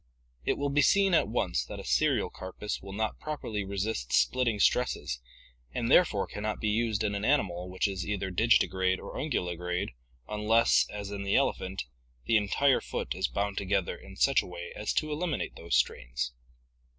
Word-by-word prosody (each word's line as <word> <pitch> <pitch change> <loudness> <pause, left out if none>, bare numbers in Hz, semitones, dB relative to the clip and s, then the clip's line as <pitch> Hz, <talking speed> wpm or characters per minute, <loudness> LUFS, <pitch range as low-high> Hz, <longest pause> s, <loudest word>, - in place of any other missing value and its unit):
It - - 0
will 145 0 -1
be 145 +1 +4
seen 195 +5 +4
at 160 - +4
once 100 -6 0
that - - -8
a - - -7
serial - - +2
carpus 95 +3 -5
will 95 - -9
not 110 +2 -2
properly 115 -9 -4
resist 100 - -3
splitting 120 -5 +2
stresses 85 - +1 0.5
and 115 +1 0
therefore 110 - +5
can 105 - -7
not 110 0 -2
be 110 - 0
used 110 -1 +1
in 105 -1 0
an 100 0 -3
animal 95 -9 +1
which 95 +3 0
is 95 -2 -3
either 100 0 -2
digiti 110 +4 +4
grade 95 +1 0
or - - -8
unguligrade 90 - -2 0.4
unless, 105 +2 +3
as 100 -1 -6
in 100 -1 -4
the 100 0 0
ele - - +4
phant, 95 +1 -5 0.4
the 115 - +2
entire 120 +6 +3
foot - - -3
is 95 +2 0
bound 100 0 -2
together 100 -2 0
in - - -13
such - - +4
a - - -10
way 85 -1 -7
as 105 - -2
to 155 -1 0
eliminate 160 +2 -2
these - - -2
strains. - - 0
100 Hz, 185 wpm, -29 LUFS, 95-115 Hz, 0.5 s, therefore